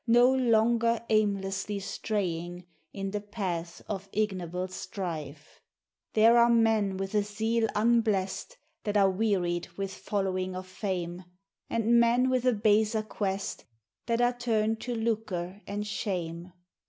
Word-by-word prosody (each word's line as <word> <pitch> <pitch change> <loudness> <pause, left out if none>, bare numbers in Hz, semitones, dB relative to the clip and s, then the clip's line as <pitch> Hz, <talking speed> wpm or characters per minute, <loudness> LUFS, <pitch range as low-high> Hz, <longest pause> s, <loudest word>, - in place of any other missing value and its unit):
No 240 +3 +6
longer 235 -2 +2
aimlessly 200 -1 +1
straying 180 -4 -3 0.3
in 195 -1 -4
the 210 0 -2
paths 185 -5 -4
of 195 -2 -6
ig 210 -1 +1
noble 180 +1 -4
strife. 160 -6 -6 0.5
There 225 +2 +6
are 235 0 +6
men 220 -4 +3
with 195 +1 -4
a 210 - +3
zeal 220 +3 0
unblest. 220 - +1 0.3
that 205 0 0
are 195 -1 +5
wearied 185 -4 0
with 195 -1 -3
following 185 -2 -2
of 185 0 -5
fame, 185 -2 -4 0.4
And 230 +1 +3
men 240 +2 +4
with 255 -1 +1
a 250 - +4
baser 215 0 +2
quest, 200 -2 -3 0.4
that 230 0 +1
are 245 0 +3
turned 225 -2 0
to 245 -1 -3
lucre 210 -5 -2
and 205 +1 -3
shame. 180 -4 -3
205 Hz, 135 wpm, -29 LUFS, 185-225 Hz, 0.5 s, No